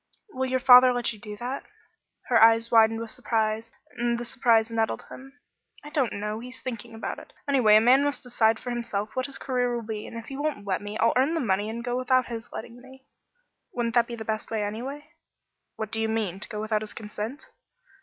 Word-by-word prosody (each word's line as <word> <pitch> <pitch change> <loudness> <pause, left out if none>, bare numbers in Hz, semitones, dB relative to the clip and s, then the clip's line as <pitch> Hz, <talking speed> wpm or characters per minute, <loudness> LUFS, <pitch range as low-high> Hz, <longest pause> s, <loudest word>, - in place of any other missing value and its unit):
"Will 260 -4 -2
your 260 0 +1
father 250 0 +8
let 245 -1 -1
you 215 - -13
do 210 -1 -8
that?" 250 +5 -4 0.6
Her 235 -3 +3
eyes 225 +1 +5
widened 225 -1 +5
with 230 -1 -5
surprise, 225 -3 -1 0.3
and 240 0 0
the 240 - -4
surprise 230 -2 +2
nettled 225 -1 -1
him. 270 +2 -12 0.5
"I 295 - -10
don't 270 -8 0
know. 210 +2 -3
He's 250 +2 -7
thinking 235 -2 -6
about 225 - -5
it. - - -15
Anyway, 250 -7 +5
a 215 - +7
man 255 +4 +5
must 285 0 -1
decide 225 -3 +2
for 245 - -5
himself 220 -3 -3
what 255 +1 -1
his 275 - -6
career 245 -2 -1
will 235 -2 -4
be, 215 -1 -5
and 230 - -8
if 230 - -7
he 270 - -6
won't 290 -8 -2
let 190 -1 -1
me, 205 +1 -6
I'll 230 - +3
earn 270 +6 +2
the - - 0
money 205 -4 0
and 235 +1 -5
go 245 0 -1
without 255 0 +2
his 230 -1 -7
letting 235 +2 -8
me." 265 +1 -16 0.7
"Wouldn't 235 -1 -1
that 235 -1 +3
be 235 - -5
the 220 -1 -7
best 215 0 -3
way, 220 -2 -1
anyway?" 255 +8 -5 0.7
"What 220 -1 -5
do 225 - -1
you 220 - 0
mean? 210 -5 -2
To - - -8
go 210 -3 -5
without 215 -1 0
his 215 - -8
consent?" 215 +5 -6
230 Hz, 225 wpm, -26 LUFS, 220-255 Hz, 0.7 s, father